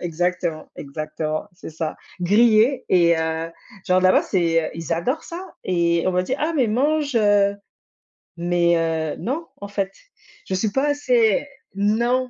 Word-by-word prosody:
exactement, 175 -1 -2
exactement, 155 +2 -4
c'est 175 -2 -10
ça, 160 0 -4 0.2
grillés 220 +6 +4
et 170 -2 +4
heu, 160 0 -2 0.4
genre, 185 0 +3
là-bas, 185 0 +4
c'est, 165 -3 +1
heu, - - -5
ils 165 0 -4
adorent 250 - -1
ça 360 +3 -9
et 170 -2 +1
on - - +3
m'a 180 0 +1
dit: 260 - -1
«Ah! 320 +2 0
Mais 255 -4 +3
mange!», 285 +5 0
heu, 205 -2 +3 0.8
mais 175 0 +2
heu, 160 -2 -1
non, 310 +8 -3
en 200 - -5
fait, 195 -1 -2 0.5
je - - -4
suis 205 +3 0
pas 270 +5 +1
assez 250 -4 +2 0.3
non, 235 +5 +1
185 Hz, 155 wpm, -22 LUFS, 165-240 Hz, 0.8 s, grillés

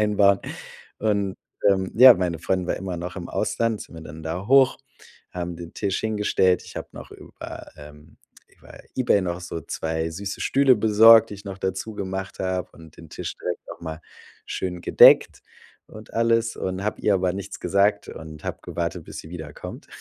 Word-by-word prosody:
einbauen. 100 -2 +3 0.6
Und, 100 -3 0 0.3
ähm, 95 -1 +1
ja, 125 +1 +10
meine 90 -2 -2
Freundin 90 +2 -1
war - - -1
immer 95 -1 -5
noch 90 +2 -6
im 85 - -6
Ausland, 115 -2 -1
sind - - -15
wir 80 - -9
dann 80 0 -10
da 85 +5 -4
hoch, 135 0 +5 0.5
haben 90 -1 -5
den 85 -1 -10
Tisch 100 -2 -1
hingestellt. 105 -4 +1
Ich - - -12
hab - - -7
noch - - -10
über - - -10
ähm, 75 +1 -14 0.3
über - - -16 0.2
eBay 120 -5 +3
noch 90 -1 -3
so 85 -1 -5
2 80 +2 -3
süße 100 +4 -6
Stühle 135 -2 +4
besorgt, 110 +1 +7
die - - -6
ich 100 +1 -13
noch 95 -1 -7
dazu 95 +4 -3
gemacht 95 -1 -5
hab 95 -1 -3
und 80 -1 -16
den 80 -2 -14
Tisch - - -6
direkt - - -4
noch - - -9
mal 80 -1 -6 0.5
schön 90 -2 -4
gedeckt - - +6 0.5
und 110 0 -13
alles. 115 0 +1
Und 95 +1 -3
hab 105 - -2
ihr 105 - +2
aber 90 -1 +1
nichts 100 0 -7
gesagt 100 +1 +1
und 75 -1 -10
hab - - -5
gewartet, 85 0 -4
bis - - -9
sie 80 - -9
wiederkommt. 80 -4 -9
95 Hz, 185 wpm, -24 LUFS, 85-105 Hz, 0.6 s, ja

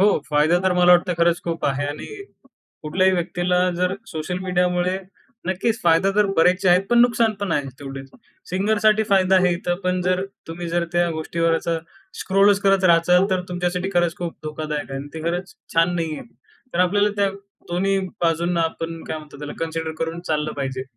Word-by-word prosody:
हो 205 +2 +6 0.2
फायदा 155 +4 +3
तर 185 - +3
मला 180 0 +6
वाटतं 175 0 +3
खरंच 170 +1 +3
खूप 165 -1 -3
आहे 140 +1 -1
आणि 145 +1 -6 0.8
कुठल्याही 185 +5 +2
व्यक्तीला 175 0 0 0.2
जर 180 +1 0
सोशल 180 +2 -4
मीडियामुळे 180 0 0 0.5
नक्कीच 220 +5 -1
फायदा 170 +3 +4
तर 210 -1 +4
बरेचसे 180 +3 +3
आहेत 180 +2 +5
पण 240 - +5
नुकसान 235 -2 +3
पण 200 - -1
आहे 145 -2 0
तेवढेच. 135 -1 -8 0.4
सिंगरसाठी 215 +3 +2
फायदा 190 -1 +4
आहे 180 -1 +3
इथं, 175 0 -2
पण 180 0 +1
जर 185 +1 0 0.2
तुम्ही 170 +1 -5
जर 170 0 0
त्या 175 0 +2
गोष्टीवरचं 165 +1 -1 0.4
स्क्रोलच 195 +1 +3
करत 195 -1 +3
राहाल 180 +3 +4
तर 185 -1 +1
तुमच्यासाठी 180 +1 -2
खरंच 175 -1 +2
खूप 175 -2 -5
धोकादायक 150 -2 -4
आहे 135 - -4
आणि 145 - -9
ते 160 - -6
खरंच 175 +1 -4 0.2
छान 165 +2 +3
नाहीये. 160 -3 -3 0.5
तर - - -1
आपल्याला 205 +3 +3
त्या 200 -1 +2 0.4
दोन्ही 195 +3 +1 0.2
बाजूंना 170 +1 +1
आपण 165 0 -3
काय 160 - -4
म्हणतात 150 -2 -13
त्याला, 150 0 -6
कन्सिडर 160 -1 -3
करून 165 +1 -3
चाललं 155 -1 -1
पाहिजे. 130 -1 -3
175 Hz, 175 wpm, -22 LUFS, 165-185 Hz, 0.8 s, हो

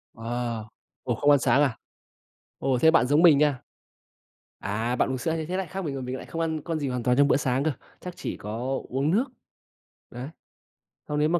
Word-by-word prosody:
À. 115 0 -3 0.4
Ủa, 120 -2 -1
không 145 +6 +2
ăn 145 - +6
sáng 140 - +3
à? 135 -6 +1 0.8
Ồ, 130 -2 +1
thế 160 - +6
bạn 160 -6 +4
giống 145 +4 +4
mình 160 -5 +7
nha. 145 -4 +2 1.0
À, 110 +5 -1
bạn - - +1
uống 130 - -1
sữa 160 +5 -1
như 160 - -3
thế 180 +3 -3
lại 190 -3 -2
khác 190 +3 -5
mình 145 - -2
rồi, 135 -1 -4
mình 125 +1 -4
lại - - -9
không 165 - -4
ăn 160 -1 -1
con 165 +1 -3
gì 140 -2 -2
hoàn 125 -2 -2
toàn 125 +2 +2
trong 140 0 +6
bữa - - +4
sáng 130 0 0
cơ, 155 - +2 0.3
chắc 180 -1 -8
chỉ - - -4
có 120 +6 -3
uống 135 +4 0
nước. 225 +8 +3 0.8
Đấy. 125 +3 -7 0.8
Xong 150 0 -1
nếu 150 - +3
mà 175 +1 +2
140 Hz, 225 wpm, -26 LUFS, 125-160 Hz, 1.0 s, mình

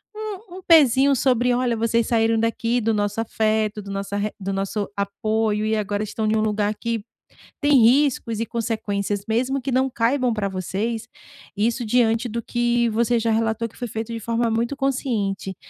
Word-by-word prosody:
um 425 -3 -7
um 380 - -9
pezinho 280 -4 +6
sobre: 250 -1 +2
"Olha, 245 -1 0
vocês 230 0 +1
saíram 225 -1 +2
daqui 230 +1 0
do 225 +1 +1
nosso 205 +1 -1
afeto, 215 -1 0
do 200 0 -8
nossa 200 +1 -3
re 205 +1 -1
do 195 0 -3
nosso 195 +1 -2
apoio 210 +2 -1
e 220 0 +1
agora 205 -1 -1
estão 215 +1 -3
em 215 - +2
um 215 - +2
lugar 210 -1 0
que 230 -1 -3 0.6
tem 290 -3 +5
riscos 240 -3 +2
e 230 - -1
consequências, 205 -3 -2
mesmo 255 +5 0
que 265 0 -3
não 260 +1 +2
caibam 245 +1 +1
pra 205 -2 -1
vocês". 210 +5 -3 0.5
Isso 230 +4 0
diante 230 +1 +2
do 235 +1 -4
que 240 0 +1
você 235 +2 +1
já 225 0 0
relatou 225 +1 0
que - - -21
foi 245 - -5
feito 225 +1 -5
de 230 - -4
forma 230 +1 0
muito 235 +5 -1
consciente. 220 -9 -2
225 Hz, 185 wpm, -22 LUFS, 215-245 Hz, 0.6 s, pezinho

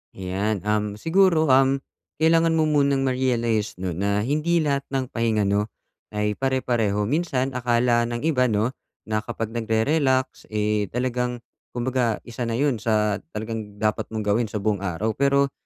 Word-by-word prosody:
Ayan, 95 +2 -2
um, 105 0 0
siguro, 165 - +3
um, 135 +1 +4 0.3
kailangan 165 +1 +3
mo 160 - +3
munang 140 -3 +2
ma-realize 120 -5 0
'no 90 0 -3
na 100 +4 0
hindi 155 +6 +1
lahat 140 -2 -1
ng 135 -1 -1
pahinga 115 -2 +1
'no 100 +1 +1 0.5
ay 105 0 +1
pare-pareho 120 -6 0
minsan 135 0 0
akala 120 -1 +2
ng 120 +1 -4
iba 130 -6 +3
'no 110 +3 +1 0.3
na 110 0 0
kapag 115 -1 -5
nagre-relax 130 +4 0
eh, 105 -1 0
talagang 125 0 -1 0.4
kumbaga 120 -2 0
isa 120 +1 -8
na 115 - -1
yun 135 -4 +1
sa 105 -2 +1 0.2
talagang 110 -1 -5
dapat 110 0 -1
mong 110 -1 -3
gawin 110 +3 +2
sa 105 - -3
buong 105 -2 +1
araw, 100 +3 -1
pero 140 +1 +2
120 Hz, 155 wpm, -24 LUFS, 105-135 Hz, 0.5 s, um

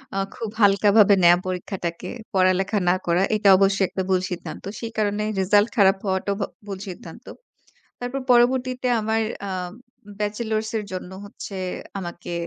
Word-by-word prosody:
আ - - -1 0.2
খুব 225 - -5
হালকা 205 0 +5
ভাবে 205 -2 +7
নেয়া 175 0 +7
পরীক্ষাটাকে, 180 -2 -4 0.2
পড়ালেখা 190 +2 +2
না 180 - +4
করা। 170 +1 +2
এটা 210 -1 +3
অবশ্যই 195 0 +3
একটা 190 - -3
ভুল 185 -1 +2
সিদ্ধান্ত। 180 - -6 0.2
সেই 230 -1 -5
কারণে 210 0 0 0.2
রেজাল্ট 205 +3 +3
খারাপ 195 -2 +5
হওয়াটাও 190 +1 -1
ভ - - +2 0.2
ভুল 195 -2 -5
সিদ্ধান্ত। 185 +6 -10 0.8
তারপর 255 +3 -3
পরবর্তীতে 255 +1 +2
আমার 220 +1 0 0.3
আম 180 -2 -4 0.5
ব্যাচেলরস 215 +1 -2
এর 210 - -5
জন্য 185 0 -6
হচ্ছে 200 0 -9 0.4
আমাকে, 175 -2 -7
200 Hz, 150 wpm, -23 LUFS, 185-215 Hz, 0.8 s, ভাবে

